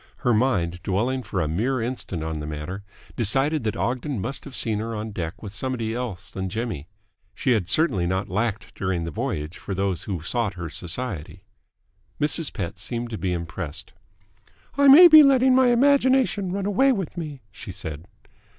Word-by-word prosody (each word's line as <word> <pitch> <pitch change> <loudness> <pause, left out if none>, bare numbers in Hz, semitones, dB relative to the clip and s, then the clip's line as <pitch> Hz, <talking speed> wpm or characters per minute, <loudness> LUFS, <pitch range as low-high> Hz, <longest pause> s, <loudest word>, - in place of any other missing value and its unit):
Her 120 - +4
mind, 95 -8 +1
dwelling 120 +9 0
for 95 -5 -4
a 80 - 0
mere 115 - 0
instant 115 -8 -4
on 80 -1 -3
the 75 - -5
matter, 75 +6 -6 0.3
decided 135 +6 +1
that 110 -2 -2
Ogden 130 +1 -2
must 125 +8 -4
have 140 -3 -9
seen 110 -2 -1
her 115 +1 -4
on 110 +1 -5
deck 85 0 -5
with 100 -2 -7
somebody 115 -2 -3
else 115 -7 -5
than 95 0 -4
Jimmy. 110 - -4 0.5
She 130 - 0
had 100 -7 +1
certainly 105 - +2
not 95 +2 -1
lacked 105 +2 -2
during 95 -3 -2
the 85 - -4
voyage 75 +3 -4
for 100 - -5
those 95 -2 -1
who 95 -4 -3
sought 110 +3 -1
her 85 -3 -6
society. 90 -2 -4 0.8
Mrs. 150 +1 +1
Pett 90 -7 -5
seemed 120 -1 -4
to 110 - -4
be 95 - -1
impressed. 80 -3 -5 0.8
"I 280 +1 +4
may 315 +6 +11
be 310 -2 +10
letting 265 -2 +5
my 260 0 +5
imagination 260 -5 +3
run 195 +1 -2
away 265 +7 +3
with 195 -9 -3
me," 150 -7 -6
she - - -9
said. 80 +1 -7
110 Hz, 180 wpm, -24 LUFS, 90-140 Hz, 0.8 s, may